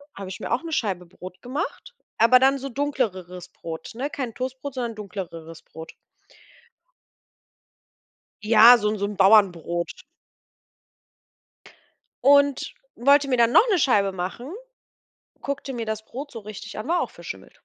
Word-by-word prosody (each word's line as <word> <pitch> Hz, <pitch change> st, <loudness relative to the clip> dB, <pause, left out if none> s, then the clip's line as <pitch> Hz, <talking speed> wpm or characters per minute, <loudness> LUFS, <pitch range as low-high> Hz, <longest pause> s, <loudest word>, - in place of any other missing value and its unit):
habe 195 Hz, -1 st, -7 dB
ich 190 Hz, -, -8 dB
mir -, -, -6 dB
auch 240 Hz, -, +1 dB
'ne 330 Hz, -, -6 dB
Scheibe 190 Hz, -, -2 dB
Brot 185 Hz, +1 st, -12 dB
gemacht, 295 Hz, -, -5 dB, 0.2 s
aber 230 Hz, +3 st, +7 dB
dann 270 Hz, +1 st, +3 dB
so 275 Hz, +1 st, -6 dB
dunkleres 205 Hz, -11 st, -3 dB
Brot, 165 Hz, -1 st, -8 dB
ne? 275 Hz, +4 st, -3 dB
Kein 250 Hz, -5 st, -5 dB
Toastbrot, 260 Hz, +2 st, -5 dB
sondern 235 Hz, -3 st, -3 dB
dunkleres 170 Hz, -5 st, -8 dB
Brot. 160 Hz, 0 st, -11 dB, 2.5 s
Ja, 225 Hz, +3 st, +8 dB
so 210 Hz, -1 st, 0 dB
'n 215 Hz, -1 st, -2 dB
so 200 Hz, -, -2 dB
'n 205 Hz, -1 st, -6 dB
Bauernbrot. 190 Hz, -, +2 dB, 2.2 s
Und 285 Hz, 0 st, +3 dB, 0.2 s
wollte 280 Hz, +3 st, +4 dB
mir 255 Hz, -, +2 dB
dann 235 Hz, 0 st, +3 dB
noch 485 Hz, -, +6 dB
'ne 380 Hz, -, +3 dB
Scheibe 205 Hz, -9 st, +2 dB
machen. 190 Hz, -, -6 dB, 0.9 s
Guckte 280 Hz, -1 st, -4 dB
mir 230 Hz, -2 st, -4 dB
das 220 Hz, 0 st, -4 dB
Brot 280 Hz, +3 st, -8 dB
so 230 Hz, -, -7 dB
richtig 210 Hz, -1 st, -9 dB
an, 215 Hz, -, -6 dB
war 345 Hz, +1 st, +1 dB
auch -, -, -4 dB
verschimmelt. -, -, -10 dB
230 Hz, 145 wpm, -24 LUFS, 190-270 Hz, 2.5 s, Ja